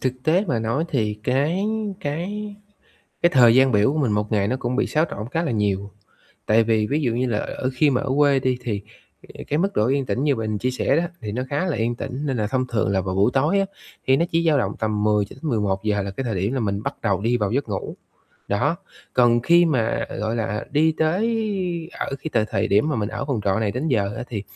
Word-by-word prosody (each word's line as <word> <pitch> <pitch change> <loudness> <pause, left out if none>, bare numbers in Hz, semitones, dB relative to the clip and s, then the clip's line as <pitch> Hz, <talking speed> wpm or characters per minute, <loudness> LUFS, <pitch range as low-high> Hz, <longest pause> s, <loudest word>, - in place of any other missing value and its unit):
Thực 130 - 0
tế 170 +7 +2
mà 125 -8 0
nói 115 +8 -1
thì 110 -9 0
cái 145 +9 +1 0.4
cái 200 +8 -4 0.7
cái 170 - +5
thời 120 -6 +6
gian 130 0 +5
biểu 105 +4 +3
của - - -2
mình 130 -7 +1
1 105 0 -1
ngày 100 -2 +2
nó 125 - 0
cũng 120 +1 -2
bị - - +1
xáo 155 +1 +2
trộn 105 - -5
khá 165 +3 0
là 150 - -1
nhiều. 100 -2 -1 0.6
Tại 110 +1 +4
vì 110 -1 +2
ví 145 +7 0
dụ 120 -4 +1
như 125 +2 0
là 115 -4 0
ở 130 +4 -3
khi 145 +3 +3
mà 125 - +1
ở 135 - -3
quê 140 -2 +4
đi, 130 -1 +1
thì 105 -5 -3 0.7
cái 145 - 0
mức 195 +3 0
độ 105 - +3
yên 135 +1 0
tĩnh 130 - -1
như 145 -2 +3
mình 110 -2 -2
chia 125 +5 0
sẻ 130 - +1
đó 165 - +2 0.2
thì 105 -3 -5
nó 125 +4 -2
khá 145 +6 0
là 175 - -1
yên 115 +1 0
tĩnh, 135 +5 -5
nên 135 -3 -1
là 105 -2 0
thông 130 +3 -1
thường 115 -6 0
là 95 -1 +2
vào 95 0 -3
buổi 100 +5 +3
tối 150 +9 +2
á - - +2 0.4
thì 130 - +5
nó 165 - +2
chỉ 165 0 +1
dao 155 -3 +4
động 100 -6 0
tầm 105 -2 -1
10:00-11:00 105 -2 0
là 100 - -4
cái 115 +8 -5
thời 115 -3 -2
điểm 95 +5 -1
là 135 - -1
mình 100 -2 -1
bắt - - -3
đầu 100 -2 +1
đi 115 +4 +1
vào 105 -4 -1
giấc 135 0 -1
ngủ. 100 -2 -4 0.5
Đó, 145 +11 +1 0.4
còn 120 -1 +4
khi 170 +7 +5
mà, 125 -9 0
gọi 110 +2 -1
là, 110 -1 -2
đi 155 +3 +3
tới 215 +7 +1 0.4
ở - - -4
cái 155 -9 0
t - - -21
thời 100 - 0
điểm 105 +9 +3
mà 150 - 0
mình 105 -2 -1
ở 140 - -4
phòng 135 -6 -1
trọ 95 +2 +1
này 105 -2 0
đến 135 +6 -2
giờ 105 -6 0
á, 120 - -4
thì 105 -4 -4
125 Hz, 250 wpm, -23 LUFS, 105-145 Hz, 0.7 s, thời